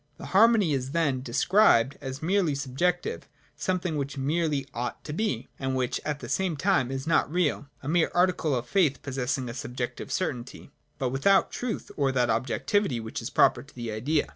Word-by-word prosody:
The - - -9
harmony 210 -5 +5
is 135 0 -2
then 145 -6 +1
de 125 - -8
scribed 140 - +4
as 135 +1 -6
merely 175 -4 +2
subjective, 150 +6 -1 0.3
something 180 -4 -1
which 140 0 -3
merely 145 0 0
ought 120 +1 -4
to 150 - -6
be, 150 - -1
and 130 -1 -1
which 130 -2 -1
at 150 -1 -3
the - - -6
same 185 -5 -1
time 185 -8 +2
is 135 +1 -4
not 160 -2 +2
real, 155 -4 0
— - - -32
a - - -6
mere 165 +2 +2
article 175 -5 +2
of 120 0 -2
faith, 165 -8 +2
possessing 130 -1 -2
a 120 - -5
subjective 125 -1 -5
certainty, 125 -9 -4 0.3
but 130 - -1
without 140 +10 +3
truth, 245 -3 -4
or 140 -2 +2
that 125 -2 +2
objectivity 135 - 0
which 110 0 -5
is - - -4
proper - - +4
to - - -17
the 120 -2 -4
Idea. 140 +8 0
140 Hz, 190 wpm, -27 LUFS, 130-175 Hz, 0.3 s, harmony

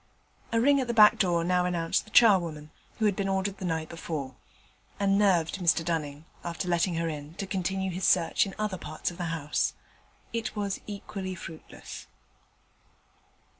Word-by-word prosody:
A 230 - +2
ring 280 +4 +4
at 255 - -3
the 235 - -2
back 210 -1 +7
door 175 -3 +2
now 180 +1 +2
announced 170 -2 0
the - - -15
charwoman, 170 -10 +4 0.3
who 220 - +1
had 205 -2 +3
been 195 0 -1
ordered 190 +1 -1
the 185 - -4
night 160 -2 -1
before, 155 -5 -5 0.7
and 195 -1 +3
nerved 195 -3 +2
Mr 165 -2 +2
Dunning, 155 -3 -3 0.2
after 170 +1 -4
letting 175 0 +1
her 165 0 -1
in, 150 0 -6
to 195 - -4
continue 190 0 -2
his 185 +2 -5
search 175 +3 +3
in 195 - -8
other 210 -4 -2
parts 155 - -4
of 175 - -13
the 175 - -2
house. 160 -3 -1 0.6
It 230 -1 -3
was 200 -2 -2
equally 195 -2 -5
fruitless. 165 -2 -10
180 Hz, 170 wpm, -28 LUFS, 165-200 Hz, 0.7 s, back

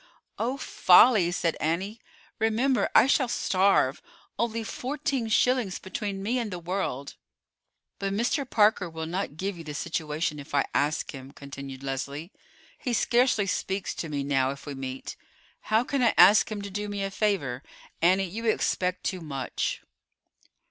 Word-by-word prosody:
"Oh, 250 +4 -1
folly!" 185 -5 +5
said 170 -2 0
Annie. 190 +8 -2 0.4
"Remember, 230 +4 +2
I - - +8
shall 265 -1 +3
starve. 190 - +2 0.4
Only 230 -1 -1
fourteen 270 0 -3
shillings 245 -3 +2
between 195 0 -5
me 240 +5 0
and 230 -3 -3
the 180 - -5
world!" 170 -6 -4 0.8
"But 195 0 -2
Mr. 240 +6 0
Parker 210 -4 +3
will 160 0 -5
not 170 -3 -4
give 190 0 -3
you - - -7
the 150 -2 -7
situation 155 -1 -2
if 145 0 -7
I 140 - +3
ask 145 +2 0
him," 135 -2 -9
continued 140 -1 -9
Leslie. 140 +5 -4 0.5
"He 250 - -2
scarcely 235 -2 +3
speaks 190 +1 -2
to 165 - -5
me 145 -2 -2
now 135 -2 +1
if 140 +1 -7
we 145 - -5
meet. 130 -1 -6 0.5
How 220 +2 +4
can 275 +1 -1
I 235 -3 +3
ask 205 +5 +7
him 205 -1 -4
to 200 - -6
do 205 +2 -4
me 200 -1 -3
a 195 - -3
favor? 185 - -1 0.4
Annie, 185 +3 +4
you 220 +6 -6
expect 185 -4 0
too 185 -3 -2
much." 135 -5 -3
190 Hz, 160 wpm, -27 LUFS, 150-220 Hz, 0.8 s, I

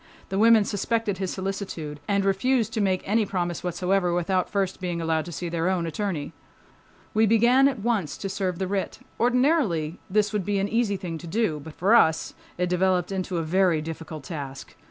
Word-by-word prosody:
The 195 - -1
women 225 -1 +6
suspected 205 -1 -1
his 190 -2 -2
solicitude 190 -6 -4
and 200 -1 +1
refused 225 +3 +1
to 220 - 0
make 190 -2 +1
any 220 +3 +3
promise 175 -4 -2
whatsoever 180 +1 0
without 180 +1 0
first 195 -2 -1
being 175 -2 -2
allowed 160 -1 0
to 175 - -7
see 175 +3 -4
their 170 +1 0
own 180 -3 0
attorney. 165 -3 -3 0.8
We 220 +1 +4
began 240 +5 +5
at 275 - -1
once 210 - -1
to 195 - -4
serve 190 -2 -2
the 190 - -1
writ. 195 0 -2 0.2
Ordinarily 240 - +2
this 210 +2 +1
would 210 -2 0
be 205 +2 -1
an 195 +1 +1
easy 225 -3 +1
thing 170 -3 -5
to 170 - -9
do. 175 -4 0
But 150 +1 -11
for 195 +6 +2
us 160 -9 +4 0.2
it 180 0 0
developed 180 0 +1
into 185 -2 -2
a 165 - -1
very 175 0 +2
difficult 160 -1 -7
task. 140 -3 -7
190 Hz, 195 wpm, -25 LUFS, 170-210 Hz, 0.8 s, women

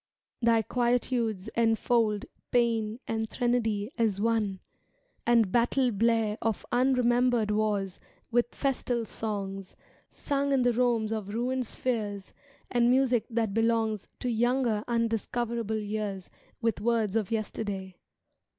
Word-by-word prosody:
Thy 230 -1 +4
quietudes 235 -3 0
enfold 225 -2 +1 0.3
Pa^an 230 -2 +1
and 220 -1 -2
threnody 230 -3 0
as 215 -4 +1
one 215 -3 0 0.7
And 230 -5 +4
battle 245 +2 +2
blare 225 0 +1
of 225 -3 -1
unremembered 245 -3 +3
wars 205 -3 0 0.3
With 240 0 +1
festal 245 -4 -1
songs, 195 -3 -5 0.3
Sung 280 -1 -1
in 260 -2 +3
the 245 -1 +3
Romes 230 -2 +1
of 215 -3 -3
ruined 250 +1 -1
spheres, 210 -7 -3 0.4
And 240 -1 +3
music 250 -3 +3
that 225 -3 -1
belongs 225 -2 +1
To 250 - -1
younger, 235 -1 +1
undiscoverable 230 -1 -1
years 205 -3 -4 0.3
With 225 -3 0
words 225 -2 +1
of 215 -4 0
yesterday. 200 -4 -3
225 Hz, 115 wpm, -28 LUFS, 210-240 Hz, 0.7 s, Thy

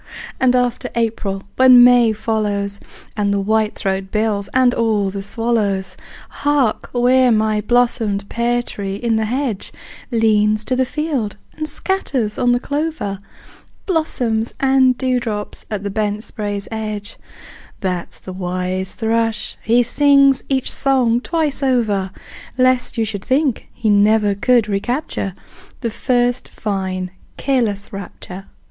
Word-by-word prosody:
And 255 -1 +3
after 245 -1 0
April, 215 -4 -1
when 255 -1 +8
May 245 -2 +6
follows, 205 -2 -2 0.4
And 205 -1 0
the 200 - +1
whitethroat 200 -3 0
builds, 210 -2 -1
and 255 -1 +3
all 215 -5 +1
the 200 0 -5
swallows! 200 -3 -1 0.5
Hark, 285 -6 +1
where 250 +1 +4
my 215 -1 +2
blossomed 225 -3 +1
pear 240 +2 0
tree 195 -4 -5
in 230 +2 0
the 220 - 0
hedge 245 -3 -2 0.4
Leans 215 -2 +2
to 255 - 0
the 260 0 +2
field 275 -6 -2 0.2
and 310 -1 -4
scatters 265 - -1
on 245 - +3
the 245 - +2
clover 285 -9 -3 0.7
Blossoms 245 - -1
and 265 -2 +4
dewdrops 240 -5 -2
at 210 -2 -3
the 200 - -3
bent 210 0 -1
spray's 205 -3 -4
edge 215 -2 -3 0.6
That's 180 -3 -3
the 185 - -8
wise 185 +1 -3
thrush; 225 -1 -1
he 235 +2 +3
sings 275 +1 +4
each 265 -2 +1
song 250 -4 +2
twice 310 -2 -1
over, 220 -8 +1 0.5
Lest 255 -1 +2
you 225 - +1
should 200 -2 -5
think 270 -2 0
he 220 -3 0
never 205 0 +4
could 230 +2 +2
recapture 205 - -2 0.5
The 230 -3 -2
first 245 +1 0
fine 190 -3 -3 0.3
careless 225 -8 -1
rapture! 195 0 -8
225 Hz, 130 wpm, -19 LUFS, 205-250 Hz, 0.7 s, when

